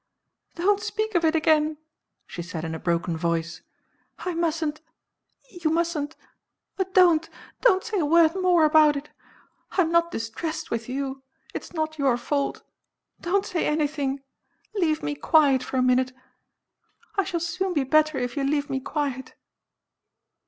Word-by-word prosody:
"Don't 395 +4 +2
speak 435 0 -2
of 345 -2 +2
it 320 0 +3
again!" 310 -1 +2 0.5
she 175 - -7
said 170 -1 -5
in 160 - -4
a 160 - -5
broken 170 0 -1
voice. 170 0 -2 0.6
"I 360 - -4
mustn't 320 -2 -1 0.7
you 345 -7 -2
mustn't 320 -2 -1 0.6
ah, 380 - +2
don't, 340 -4 +5 0.3
don't 405 -6 +4
say 445 -4 -2
a 315 - +1
word 330 0 +5
more 365 -4 +3
about 305 -1 +5
it! 285 +2 -6 0.6
I'm 340 -4 +2
not 335 0 +3
distressed 315 +5 -4
with 230 0 -3
you 270 0 -3 0.3
it - - -5
is - - -14
not 315 -1 -3
your 270 -4 +3
fault. 280 +3 -2 0.6
Don't 390 +3 0
say 345 - -1
anything 290 -3 -1 0.5
leave 335 -7 0
me 145 - -1
quiet 270 - +4
for 260 - -4
a 255 - +3
minute. 255 0 +2 1.0
I 395 - +2
shall 365 -2 -2
soon 360 +2 -2
be 290 - +2
better 310 +2 +3
it 245 -1 -2
you 280 - -1
leave 285 +1 0
me 265 - 0
quiet." 270 -2 -4
310 Hz, 155 wpm, -25 LUFS, 265-340 Hz, 1.0 s, don't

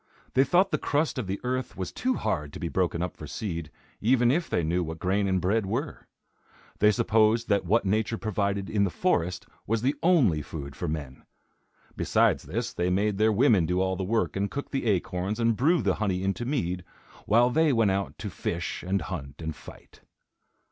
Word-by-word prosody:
They 130 - +5
thought 180 +8 +3
the - - +1
crust 150 -1 0
of 110 - -4
the 95 +1 -3
earth 130 0 -3
was 95 -2 -4
too 255 0 -1
hard 75 -1 -2
to - - -7
be 85 - -3
broken 85 -2 0
up 90 - -4
for 75 - -9
seed, 85 -2 -4 0.3
even 120 +1 +3
if 170 +4 0
they 85 - 0
knew 85 +3 0
what 80 0 -5
grain 95 +4 0
and 95 -1 +1
bread 100 +3 +1
were. 130 +10 -4 0.7
They 105 - +6
supposed 110 +2 +2
that 100 -2 +2
what 110 +3 +3
nature 110 +3 0
provided 100 -2 -1
in 105 -2 +1
the 100 - +2
forest 90 - 0 0.2
was 115 +1 0
the 135 +3 +2
only 135 - +4
food 70 -2 -7
for - - -4
men. 70 -4 -5 0.7
Besides - - +2
this, - - -3
they 90 +1 0
made 100 +2 +1
their 110 +1 +4
women 105 - +4
do 90 +1 0
all 95 0 +1
the 95 - -3
work 110 +5 0
and 100 +1 -1
cook 140 +8 -6
the 135 -4 -2
acorns 95 +1 -1
and 115 -1 +2
brew 160 +9 +2
the - - +2
honey 95 -4 -1
into 100 +5 -1
mead, 90 - -2 0.4
while 120 +4 +4
they 160 +2 +3
went 115 -5 +3
out 95 0 -2
to 105 - -6
fish 85 +1 -3
and 95 +2 -1
hunt 70 -7 -6
and 80 -1 -4
fight. - - -14
100 Hz, 205 wpm, -27 LUFS, 90-115 Hz, 0.7 s, They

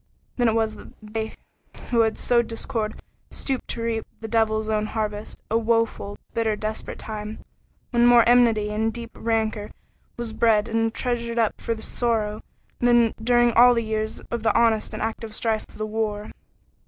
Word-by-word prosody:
Then 245 -2 +3
it 225 - +2
was 220 -1 0
that - - -13
they 220 +1 -4 0.6
who 235 - +3
had 220 -1 +3
sowed 235 -1 +2
discord 225 -1 -3 0.3
stooped 265 -2 -3
to 230 - -3
reap 225 -1 -2
the 225 - -6
Devil's 220 -1 +1
own 215 -1 0
harvest, 215 -1 -4
a 225 - +3
woeful, 225 -3 0 0.2
bitter, 225 -2 +1
desperate 215 +1 -4
time, 215 0 -7 0.5
when 240 -1 +4
more 240 -1 +7
enmity 230 -4 +4
and 220 +1 0
deep 235 0 -7
rancor 220 -2 -1 0.5
was 235 -2 -4
bred 220 -2 +3
and 225 0 +1
treasured 235 -1 -2
up 225 -2 +1
for 230 - -1
future 220 - -10
sorrow 220 -3 -1 0.4
than 240 -2 +4
during 240 0 +4
all 245 +2 +7
the 230 - +1
years 220 0 -3
of 235 - -2
the 220 0 +2
honest 225 -2 +2
and - - -3
active 225 -1 -4
strife 220 -2 -1
of - - -15
the 215 - -2
war. 215 -1 -3
225 Hz, 175 wpm, -24 LUFS, 215-235 Hz, 0.6 s, more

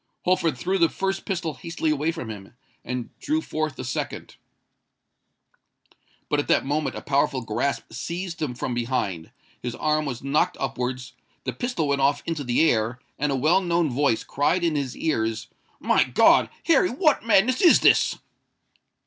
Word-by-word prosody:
Holford 170 -6 +1
threw 190 +9 -1
the 165 -1 +4
first 195 +2 -3
pistol 175 -5 -2
hastily 165 +3 -2
away 150 +2 0
from 145 -9 -6
him, 100 +1 -11 0.3
and 125 -1 -5
drew 310 +2 0
forth 155 - -3
the - - -6
second. 125 - -5 1.9
But - - +1
at - - -2
that - - +2
moment 145 -1 -1
a - - -7
powerful 140 -1 +1
grasp 115 +5 -2
seized 170 +6 -5
him 135 -5 -2
from 125 - -3
behind,—his 120 -1 -4
arm 155 +2 0
was 125 -3 -5
knocked 150 +6 +1
upwards,—the 130 -1 -5
pistol 245 - -2
went 140 -1 +1
off 140 +1 +2
into 165 -3 -3
the 125 +6 +3
air,—and 125 +5 -1
a - - +1
well 155 +8 +3
known 170 -4 +1
voice 135 -2 +1
cried 170 +6 0
in 165 -2 +1
his 140 -4 -3
ears, 115 -8 -1 0.3
"My - - +3
God! - - +4 0.2
Harry, 345 +2 +4
what 300 +3 +2
madness 230 +3 +3
is 350 - +7
this?" - - +4
145 Hz, 155 wpm, -24 LUFS, 125-170 Hz, 1.9 s, is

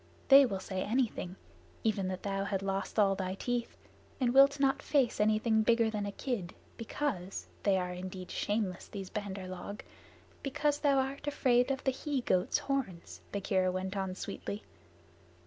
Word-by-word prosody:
They 275 0 +9
will 195 -4 -3
say 190 0 -4
anything 215 -5 -1 0.5
even 205 -4 +1
that 185 0 -4
thou 195 -1 -1
hast 195 -1 -1
lost 195 +2 -2
all 200 -2 +5
thy 190 -1 -3
teeth, 240 +3 -2 0.4
and 245 -2 +2
wilt 275 +1 +6
not 270 -1 +2
face 270 -5 +2
anything 215 +1 +3
bigger 230 0 +3
than 205 -2 -2
a - - -3
kid, 200 -6 -3 0.2
because 225 -6 -3 0.2
(they 195 -2 +3
are 180 -1 -2
indeed 185 0 -7
shameless, 205 -4 -1
these 195 -2 -7
Bandar 200 -3 -4
log) 185 +3 -7 0.6
because 290 +1 0
thou 280 -2 +3
art 270 +2 -1
afraid 250 -3 +3
of 270 0 -1
the 265 - +2
he 270 +1 -2
goat's 185 -6 +2
horns," 255 -12 -3
Bagheera 190 -2 +1
went 190 +2 -3
on 190 -1 -2
sweetly. 200 +2 -5
210 Hz, 165 wpm, -32 LUFS, 190-255 Hz, 0.6 s, They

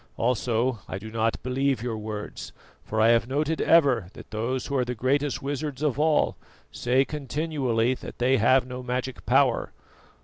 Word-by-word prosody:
Also 120 0 0
I - - -3
do 110 +3 -9
not 115 0 -1
believe 130 -1 0
your 120 -2 -2
words, 105 -1 -6 0.3
for 110 - -3
I 110 +1 +5
have 115 0 +3
noted 150 +4 -1
ever 135 - +4
that - - -13
those 120 +4 -2
who 140 - -3
are 130 - +2
the 125 0 -4
greatest 140 +5 0
wizards 145 0 -3
of 145 -2 0
all 155 0 +2 0.4
say 130 +3 +2
continually 140 -5 -1
that - - -9
they 130 +2 +3
have 125 +3 +4
no 125 0 -6
magic 125 +1 -4
power. 130 -1 +2
125 Hz, 170 wpm, -26 LUFS, 115-140 Hz, 0.4 s, I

